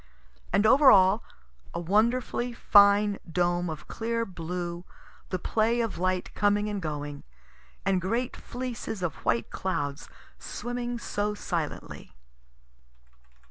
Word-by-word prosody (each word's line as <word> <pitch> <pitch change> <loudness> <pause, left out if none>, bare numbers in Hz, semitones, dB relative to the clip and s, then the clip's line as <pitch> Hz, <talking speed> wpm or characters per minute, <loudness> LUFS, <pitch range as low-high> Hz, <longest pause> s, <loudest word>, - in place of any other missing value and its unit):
And 200 +3 +3
over 270 +5 +7
all 190 +2 +6 0.5
a - - -1
wonderfully 235 +6 +1
fine 205 -2 +5
dome 175 0 +1
of 155 -2 -7
clear 230 0 -2
blue, 175 -1 -5 0.5
the 185 - -1
play 225 +5 +1
of 230 -6 -2
light 185 0 -1
coming 205 0 +2
and 205 -2 -3
going, 145 -2 -5 0.6
and 190 -2 +2
great 230 +7 -1
fleeces 240 -5 -5
of 170 -4 -1
white 115 0 0
clouds 145 -6 -3 0.3
swimming 245 0 -4
so 210 -2 -2
silently. 165 - -5
200 Hz, 115 wpm, -28 LUFS, 175-230 Hz, 0.6 s, over